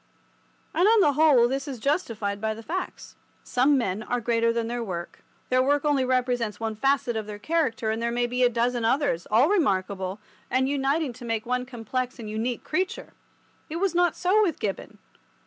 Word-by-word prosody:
And 355 +4 +3
on 450 0 +6
the 295 -7 +4
whole 280 -5 +5
this 270 +2 -3
is 270 -3 -5
justified 220 - -1
by 220 0 -1
the 225 - -10
facts. 365 +9 -5 0.3
Some 270 +3 +3
men 210 -4 -1
are 245 +3 -2
greater 230 0 +1
than 230 -1 -1
their 240 0 -3
work. 175 -5 -6 0.3
Their 255 0 +3
work 285 +2 +1
only 285 -3 +2
represents 250 -4 0
one 225 -1 -3
facet 270 0 +1
of 220 -1 -3
their 210 -1 -6
character, 230 -4 0
and 220 +1 -2
there 235 - 0
may 240 +1 0
be 250 +1 -2
a 245 - +5
dozen 240 0 0
others, 230 - +1
all 230 +7 +5
remarkable, 195 - 0 0.3
and 260 +1 +2
uniting 280 0 0
to 245 - -12
make 225 -2 -2
one 250 +1 -1
complex 250 +1 -4
and 230 -3 -8
unique 225 +3 -3
creature. 370 +4 -3 0.6
It 310 - -5
was 370 +1 0
not 350 -1 +2
so 375 +4 +3
with 350 -8 +1
Gibbon. 200 -3 -4
245 Hz, 195 wpm, -26 LUFS, 225-285 Hz, 0.6 s, on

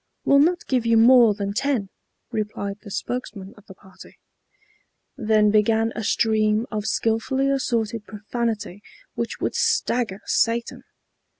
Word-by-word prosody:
"We'll 280 - +5
not 345 +4 +2
give 250 -3 0
you 230 0 +4
more 235 -2 +6
than 200 -1 -3
ten," 235 -4 -1 0.4
replied 210 -3 -4
the 215 - -11
spokesman 205 -2 -5
of 205 -1 -20
the 190 - -12
party. 190 0 -16 1.0
Then 215 -4 +2
began 220 +1 +2
a 225 - -4
stream 215 +1 +1
of 215 -1 -3
skilfully 225 +5 0
assorted 230 -5 -2
profanity 215 -2 -4 0.3
which 235 -1 -4
would - - -1
stagger 245 - 0
Satan. 230 0 0
225 Hz, 130 wpm, -23 LUFS, 210-240 Hz, 1.0 s, more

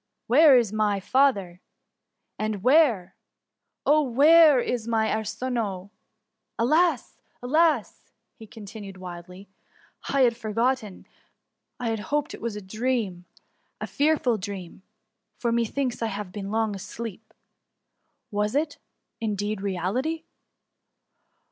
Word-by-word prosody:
Where 280 +2 +7
is 225 -4 +1
my 210 -2 +1
father? 200 -7 +1 0.8
And 215 -2 -3
where! 255 - +3 0.7
oh, 305 +1 +5
where, 295 +2 +6
is 240 -2 -2
my 220 -1 +1
Ardnoe? 215 -3 -3 0.7
Alas, 305 +3 +1 0.2
alas!'' 305 -2 +1 0.4
continued 205 -2 -10
he - - -14
wildly; 180 +2 -10 0.3
" - - -15
I 275 - +2
had 240 -2 +4
forgotten— 230 -1 -2 0.7
I 230 -2 -1
hoped 295 +8 -2
it - - -10
was 230 -2 -3
a 210 - -7
dream, 215 -3 -2 0.5
a - - -3
fearful 285 -6 +1
dream, 190 -2 -7 0.6
for 235 - -1
methinks 235 +2 -1
I 230 - 0
have 205 -3 -5
been 195 0 -6
long 220 -1 0
asleep. 220 +2 -8 1.0
Was 210 +3 -1
it^ 300 0 -1 0.4
indeed, 210 -2 -2
reality 210 - -2
225 Hz, 110 wpm, -25 LUFS, 200-260 Hz, 1.0 s, Where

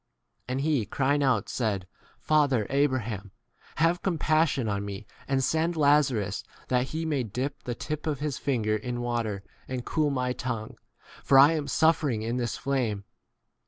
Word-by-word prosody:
2i - - -50
And 135 - -1
he 145 -5 +1
crying 140 +5 +1
out 130 -7 +2
said, 105 -6 -1 0.3
Father 140 -8 +2
Abraham, 120 -8 0 0.5
have 165 +3 +2
compassion 155 - +1
on 100 -1 -1
me, 100 0 -6 0.2
and 135 -1 +1
send 160 +5 +1
Lazarus 135 -9 +2 0.3
that 125 0 +2
he 160 +3 -3
may 150 -4 0
dip 125 +5 -4
the 120 - -3
tip 155 +5 -4
of 150 -2 0
his 145 -2 -2
finger 110 -6 0
in 120 +3 -3
water 115 -5 -2 0.2
and 125 -2 -4
cool 155 -2 +1
my 125 -2 -1
tongue, 115 -4 -4 0.5
for 135 - +5
I 140 +2 +9
25 165 - +1
am 145 - -5
suffering 145 -5 +2
in 115 +2 -1
this 120 -2 -2
flame. 125 -7 -1
130 Hz, 165 wpm, -27 LUFS, 115-145 Hz, 0.5 s, I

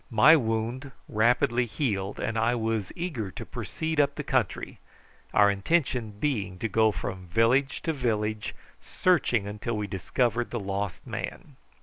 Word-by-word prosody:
My 130 +7 +7
wound 120 +1 -1 0.2
rapidly 120 +2 +2
healed, 105 -6 -2
and 115 - -2
I 115 +2 +2
was 110 -4 -1
eager 155 - -3
to - - -8
proceed 160 -1 -3
up 140 -1 +3
the - - -4
country, - - -1 0.5
our 100 -1 +5
intention 120 - 0
being 105 -11 -1
to 115 - -2
go 110 +1 +3
from 95 -2 -5
village 115 +9 +2
to 160 - 0
village 110 -5 -1 0.3
searching 140 - +2
until 105 +2 -3
we 105 - -2
discovered 120 +5 -1
the 120 - -3
lost 100 -1 -3
man. - - -6
115 Hz, 145 wpm, -27 LUFS, 105-130 Hz, 0.5 s, My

